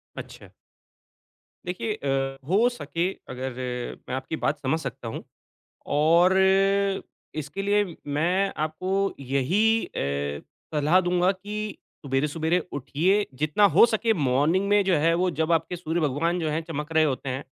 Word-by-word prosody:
अच्छा। -, -, -10 dB, 1.2 s
देखिए 210 Hz, +5 st, -2 dB
अ, 135 Hz, -4 st, -2 dB
हो 205 Hz, +8 st, +4 dB
सके 170 Hz, -5 st, -2 dB, 0.2 s
अगर 130 Hz, +1 st, -4 dB, 0.6 s
मैं 125 Hz, -, -2 dB
आपकी 130 Hz, +4 st, -4 dB
बात -, -, -1 dB
समझ 150 Hz, +4 st, 0 dB
सकता 135 Hz, -5 st, -6 dB
हूँ 110 Hz, -, -6 dB, 0.7 s
और 170 Hz, +5 st, +5 dB, 1.1 s
इसके 150 Hz, +6 st, -5 dB
लिए 200 Hz, -3 st, +1 dB
मैं 175 Hz, +7 st, +1 dB
आपको 155 Hz, +4 st, -5 dB, 0.3 s
यही 170 Hz, -, +1 dB
अ, 70 Hz, +1 st, -3 dB, 0.3 s
सलाह 150 Hz, +5 st, +4 dB
दूँगा 180 Hz, +1 st, +2 dB
कि 210 Hz, +2 st, -6 dB, 0.3 s
सुबेरे-सुबेरे 150 Hz, +5 st, 0 dB, 0.2 s
उठिए। 175 Hz, +9 st, +1 dB
जितना 155 Hz, +7 st, +2 dB
हो 195 Hz, -, +9 dB
सके 225 Hz, 0 st, +1 dB
मॉर्निंग 150 Hz, +4 st, +1 dB
में 205 Hz, 0 st, +4 dB
जो 185 Hz, -2 st, +3 dB
है 165 Hz, +3 st, +3 dB
वो 185 Hz, -, +2 dB
जब 160 Hz, +1 st, +1 dB
आपके 165 Hz, +2 st, +1 dB
सूर्य 170 Hz, -1 st, -2 dB
भगवान 160 Hz, +5 st, 0 dB
जो 160 Hz, -2 st, -1 dB
हैं 155 Hz, +2 st, -1 dB
चमक 150 Hz, -1 st, -5 dB
रहे 160 Hz, -, +5 dB
होते 135 Hz, -2 st, -1 dB
हैं। 130 Hz, +2 st, -3 dB
160 Hz, 145 wpm, -25 LUFS, 140-185 Hz, 1.2 s, हो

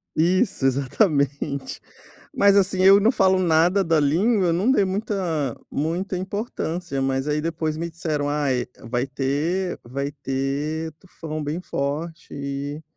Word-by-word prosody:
Isso, 175 Hz, -3 st, +2 dB
exatamente, 140 Hz, -, 0 dB, 0.6 s
mas, 200 Hz, 0 st, +5 dB
assim, 190 Hz, -1 st, +2 dB
eu 195 Hz, +2 st, +8 dB
não 220 Hz, +4 st, +4 dB
falo 190 Hz, -2 st, +3 dB
nada 175 Hz, +3 st, +3 dB
da 165 Hz, -2 st, +2 dB
língua, 180 Hz, +6 st, +2 dB
não 185 Hz, +8 st, +1 dB
dei 260 Hz, -7 st, +4 dB
muita 185 Hz, -, -2 dB
muita 175 Hz, +6 st, -2 dB
importância, 180 Hz, -, -3 dB
mas 135 Hz, +1 st, 0 dB
aí 150 Hz, +1 st, +1 dB
depois 160 Hz, -1 st, -2 dB
me 170 Hz, +1 st, -3 dB
disseram: 155 Hz, -3 st, -2 dB
"Ai 140 Hz, -4 st, 0 dB, 0.2 s
vai 125 Hz, +2 st, 0 dB
ter 150 Hz, +8 st, -1 dB
vai 140 Hz, +3 st, -3 dB
ter 140 Hz, +3 st, -3 dB
tufão 155 Hz, -4 st, -7 dB
bem 150 Hz, +5 st, -3 dB
forte 160 Hz, +3 st, -4 dB
e 140 Hz, +2 st, -5 dB
160 Hz, 135 wpm, -23 LUFS, 140-185 Hz, 0.6 s, eu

